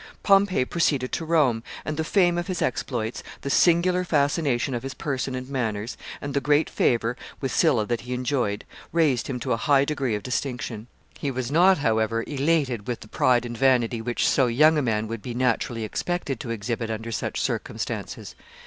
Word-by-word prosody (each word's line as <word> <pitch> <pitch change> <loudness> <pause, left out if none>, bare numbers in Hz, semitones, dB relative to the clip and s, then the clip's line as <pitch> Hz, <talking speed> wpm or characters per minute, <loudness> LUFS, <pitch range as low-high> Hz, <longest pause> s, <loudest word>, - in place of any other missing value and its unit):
] - - -33
Pompey 195 -7 +4
proceeded 140 -5 0
to 165 - -2
Rome, 145 -9 +2 0.2
and 155 - -2
the 160 - -1
fame 175 0 +3
of 175 - -4
his 185 -3 -2
exploits, 120 -2 -2 0.2
the 140 - -3
singular 180 +3 +4
fascination 145 -5 +1
of 120 - -2
his 135 0 -6
person 130 -4 -3
and 130 0 -5
manners, 115 -4 -2 0.2
and 140 -1 -5
the 140 - +1
great 150 +2 +2
favor 115 0 +1 0.2
with 135 - -2
Sylla 135 -10 +3
that 120 +1 -2
he 125 +1 -4
enjoyed, 125 -5 -1 0.3
raised 155 -7 +2
him 130 -2 -3
to - - -2
a - - 0
high 140 +3 +3
degree 140 -6 -1
of 105 - -5
distinction. 120 -3 -3 0.3
He 140 - -2
was 130 -1 -3
not, 180 +5 +5
however, 115 -3 +1
elated 140 -6 0
with 120 -2 -3
the - - -11
pride 120 +2 +2
and 120 0 -5
vanity 120 -2 +2
which 120 +1 0
so 130 - +3
young 150 +7 +5
a 150 - +2
man 110 -4 0
would 115 -1 -5
be 120 +1 -6
naturally 120 -2 0
expected 140 - -3
to 120 - -6
exhibit 115 +1 -3
under 115 +1 -4
such - - -3
circumstances. - - -4
130 Hz, 195 wpm, -25 LUFS, 115-150 Hz, 0.3 s, not